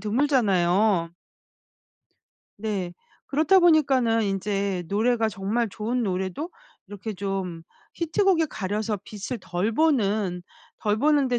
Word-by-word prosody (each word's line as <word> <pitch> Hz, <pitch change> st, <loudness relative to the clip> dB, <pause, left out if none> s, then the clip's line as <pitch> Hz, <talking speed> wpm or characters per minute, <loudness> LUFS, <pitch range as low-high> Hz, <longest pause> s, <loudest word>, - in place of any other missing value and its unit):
드물잖아요. 205 Hz, -, +2 dB, 1.5 s
네. 200 Hz, -4 st, -3 dB, 0.3 s
그렇다 310 Hz, +7 st, +4 dB
보니까는 265 Hz, -9 st, +4 dB
인제 195 Hz, -2 st, -1 dB
노래가 225 Hz, +3 st, +2 dB
정말 215 Hz, +3 st, -1 dB
좋은 225 Hz, +5 st, -2 dB
노래도 190 Hz, -, -2 dB, 0.4 s
이렇게 205 Hz, +2 st, -6 dB
좀 190 Hz, -4 st, -4 dB, 0.3 s
히트곡에 340 Hz, 0 st, +2 dB
가려서 210 Hz, -2 st, -3 dB
빛을 215 Hz, +4 st, -6 dB
덜 180 Hz, +5 st, -2 dB
보는 215 Hz, -, +1 dB, 0.4 s
덜 210 Hz, 0 st, 0 dB
보는데 275 Hz, -2 st, +3 dB
215 Hz, 235 characters per minute, -25 LUFS, 195-255 Hz, 1.5 s, 그렇다